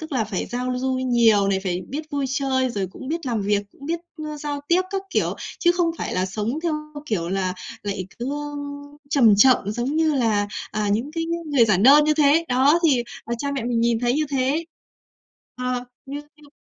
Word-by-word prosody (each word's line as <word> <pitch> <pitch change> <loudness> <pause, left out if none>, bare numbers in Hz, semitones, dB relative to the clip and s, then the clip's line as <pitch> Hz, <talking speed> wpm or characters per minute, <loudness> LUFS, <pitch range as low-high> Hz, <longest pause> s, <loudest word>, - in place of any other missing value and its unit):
tức 315 -2 -8
là 240 -4 +1
phải 200 -3 -3
giao 250 +1 -2
du 260 0 0
nhiều 235 -6 +3
này, 190 -1 +1
phải 180 -2 -2
biết 290 +4 -4
vui 280 -2 -1
chơi, 260 -1 0
rồi 200 -4 -2
cũng 200 +8 -10
biết 330 -1 -3
làm 230 -4 0
việc, 205 0 +1
cũng 280 - -12
biết, 335 +2 -1 0.3
a, 300 - -6
giao 290 -1 -4
tiếp 355 +2 +4
các 390 -1 -2
kiểu. - - 0 0.3
Chứ 345 -2 +4
không 350 -2 +1
phải - - -3
là 185 +1 +1
sống 215 +8 -3
theo, 335 - 0 0.3
kiểu, 175 -6 -1
là 185 -1 -1 0.3
lại 195 -3 -3
cứ, 245 +3 -3
ơ, 290 - -2 0.7
chầm 235 -9 +6
chậm 255 +5 +7 0.2
giống 245 +7 -2
như 315 -1 +2
là, 220 -6 +2 0.2
à, 210 -1 -1
những 235 +7 -1
cái 330 -1 -2
ng 335 -2 -4
người 270 -5 +5
giản 205 -4 +2
đơn 285 +5 +8
như 305 0 +3
thế. 300 +2 +4
Đó, 270 +6 +4
thì, 255 -5 +3 0.2
ờ, 235 - -2
cha 280 - -2
mẹ 265 -4 -3
mình 240 -1 0
nhìn 235 -1 +2
thấy 245 0 +2
như 305 +3 +1
thế. 275 +4 0 0.9
Ờ, 250 0 -2 0.2
nhưng 285 +2 -5
như 300 -1 -18
255 Hz, 220 wpm, -23 LUFS, 220-295 Hz, 0.9 s, đơn